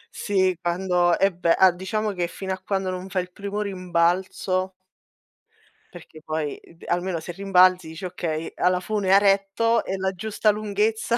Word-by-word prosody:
Sì, 190 -3 +1
quando 175 -1 +1
e 195 0 +2
beh, 170 -1 +2
a 190 -1 +6
diciamo 210 +4 -2
che 180 -3 -2
fino 190 +2 -5
a 190 - -7
quando 190 -1 -1
non 185 +1 -6
fai 185 -1 -1
il 180 - -14
primo 200 +2 -4
rimbalzo 185 0 0 1.2
perché 160 -2 -13
poi, 155 -2 -3
uhm, 165 - -19
almeno 175 0 -1
se 160 +2 -7
rimbalzi 185 -2 +4
dici: 160 +3 -8
"Okay 165 -3 -4
a 180 - +2
la 180 0 +1
fune 195 0 0
ha 195 - +8
retto, 200 +3 +2
è 190 - -3
la 190 0 -1
giusta 215 +3 -1
lunghezza 215 +2 0
185 Hz, 170 wpm, -24 LUFS, 175-200 Hz, 1.2 s, ha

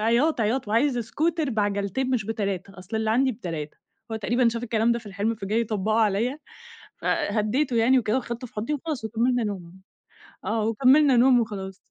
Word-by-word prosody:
عياط، 235 +7 +2
عياط، 225 +2 0
"وعايز 245 +5 +2
اسكوتر 310 +6 -1
بعجلتين 205 +3 -1
مش 245 -5 0
ب3 195 -3 -4
أصل 190 +5 -6
اللي 220 0 0
عندي 260 +3 +2
ب3." 165 -9 -6 0.3
هو - - -1
تقريبًا 235 +3 +2
شاف 230 +1 -3
الكلام 230 0 +1
ده 235 - -1
في 230 - -14
الحِلم 205 +3 -1
فجاي 215 +2 -1
يطبّقه 215 -1 0
عليّا. 225 +7 +1 0.6
فهدّيته 230 +6 0
يعني 240 +3 +4
وكده 225 -1 0
وخدته 240 0 -5
في - - -22
حُضني 230 +8 -2
وخلاص 295 -4 -4
وكملنا 235 +2 +1
نوم، 190 -3 -6 0.6
آه. 220 0 -1
وكمّلنا 265 +5 +5
نوم 250 0 +6
وخلاص. 195 -4 -4
225 Hz, 170 wpm, -25 LUFS, 210-250 Hz, 0.6 s, نوم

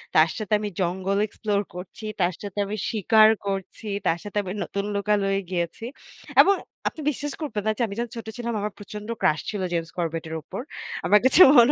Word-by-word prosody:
তার 155 +1 +6
সাথে 215 -1 -3
আমি 210 - -3
জঙ্গল 190 +2 0
এক্সপ্লোর 205 -1 -1
করছি, 180 +4 -8 0.2
তার 175 +1 +2
সাথে 205 -1 -7
আমি 210 +2 -4
শিকার 220 0 +5 0.2
করছি, 195 +2 -4 0.2
তার 170 -1 +3
সাথে 205 0 -6
আমি 185 - -5
নতুন 200 0 -3
লোকালয়ে 200 -1 +1
গিয়েছি 175 +4 -2 0.6
এবং 395 - +5 0.3
আপনি 315 - -3
বিশ্বাস 290 0 -3
করবেন 230 -9 -2
না - - +4
যে, - - -2
আমি 200 - -6
যখন 235 -1 -2
ছোট 225 - -7
ছিলাম 235 -1 -3
আমার 210 +1 -2
প্রচন্ড 210 +1 -8
ক্রাশ 155 - +3
ছিল 205 -3 -3
James 165 -1 -2
Corbett 165 -2 -2
এর 160 - -4
উপর। 155 - -6 0.4
আমার 210 - +6
কাছে 260 +7 +6 0.2
মনে 240 +3 +8
205 Hz, 195 wpm, -25 LUFS, 180-220 Hz, 0.6 s, মনে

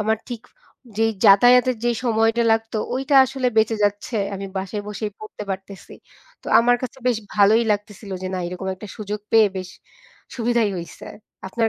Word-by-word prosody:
আমার 220 +1 +1
ঠিক 240 -2 -6 0.5
যেই 225 0 +2
যাতায়াতের 245 +5 +6
যেই 240 -1 +1
সময়টা 225 0 +2
লাগতো 225 0 -1 0.2
ওইটা 270 +2 -1
আসলে 260 -1 -3
বেঁচে 220 0 +3
যাচ্ছে, 205 +3 -2 0.2
আমি 195 0 -6
বাসায় 195 +2 -4
বসেই 210 0 -4
পড়তে 215 -1 -9
পারতেছি। 190 0 -8 0.5
তো - - -16
আমার 245 +1 +4
কাছে 255 +1 -6
বেশ 245 -3 +2 0.2
ভালোই 210 +2 +5
লাগতেছিল 205 0 -6
যে - - -3
না 185 - -2
এরকম 180 +2 -6
একটা 205 +2 -11
সুযোগ 210 0 -5
পেয়ে 220 -2 +6
বেশ 185 -1 -5 0.7
সুবিধাই 235 -2 +1
হইছে। 170 -1 -9 0.4
আপনার 225 +3 0
220 Hz, 165 wpm, -21 LUFS, 200-235 Hz, 0.7 s, যাতায়াতের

